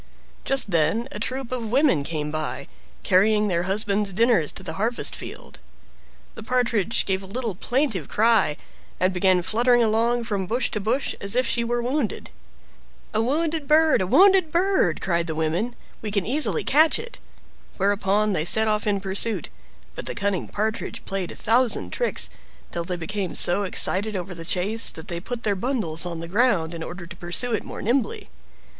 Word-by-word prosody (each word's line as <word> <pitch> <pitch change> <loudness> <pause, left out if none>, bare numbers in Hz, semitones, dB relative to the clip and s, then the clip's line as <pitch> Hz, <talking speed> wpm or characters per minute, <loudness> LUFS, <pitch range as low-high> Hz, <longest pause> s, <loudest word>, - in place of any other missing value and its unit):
Just 270 -6 +3
then 170 +9 +1
a - - -6
troop 260 -1 -4
of 235 -4 -3
women 265 - +3
came 150 0 -3
by, 155 0 -4 0.4
carrying 210 +3 +3
their 175 +1 -1
husbands 205 0 0
dinners 220 -5 +2
to - - -6
the 160 - -5
harvest 225 +6 -1
field. - - -10 0.7
The - - -10
Partridge 230 -2 0
gave 190 0 -1
a 190 - -10
little 230 +1 -3
plaintive 225 - -1
cry, 210 -9 +3 0.4
and 185 +1 +2
began 185 -1 +2
fluttering 240 +4 +3
along 230 +2 +1
from 200 -5 -3
bush 240 +6 -1
to 210 - -2
bush 235 +7 -1
as 200 +2 +1
if 255 +1 +2
she 235 0 0
were 240 +1 -1
wounded. 255 -2 -2 0.8
"A 220 - +2
wounded 305 +4 -1
bird! 310 -4 +4
a 185 - -1
wounded 375 - +5
bird!" 355 - +1
cried 170 -2 0
the 160 - -3
women; 170 +10 -1 0.3
"we 215 - -4
can 200 -2 0
easily 240 - +1
catch 310 +3 +4
it." 475 +1 -9 0.6
Whereupon 205 +1 +1
they 155 - 0
set 220 +6 +4
off 215 0 0
in 200 -2 +1
pursuit, 195 +3 -2 0.4
but - - -8
the - - -3
cunning 200 -4 -1
Partridge 220 +2 -3
played 195 -2 -3
a - - -8
thousand 240 +2 +1
tricks, 485 - 0 0.4
till 170 -1 -3
they 180 0 -3
became 185 +2 -3
so 175 +3 +2
excited 200 +2 +2
over 180 0 -4
the 165 -1 -9
chase 200 +6 +1
that 160 - -9
they 170 -1 -3
put 235 +6 -6
their 205 - +1
bundles 190 - 0
on 170 -2 -5
the 165 - -6
ground 190 -5 +1
in 165 - -6
order 175 +2 -7
to 170 0 -9
pursue 175 +8 0
it 220 - -1
more - - -8
nimbly. 275 - -1
210 Hz, 180 wpm, -24 LUFS, 180-240 Hz, 0.8 s, wounded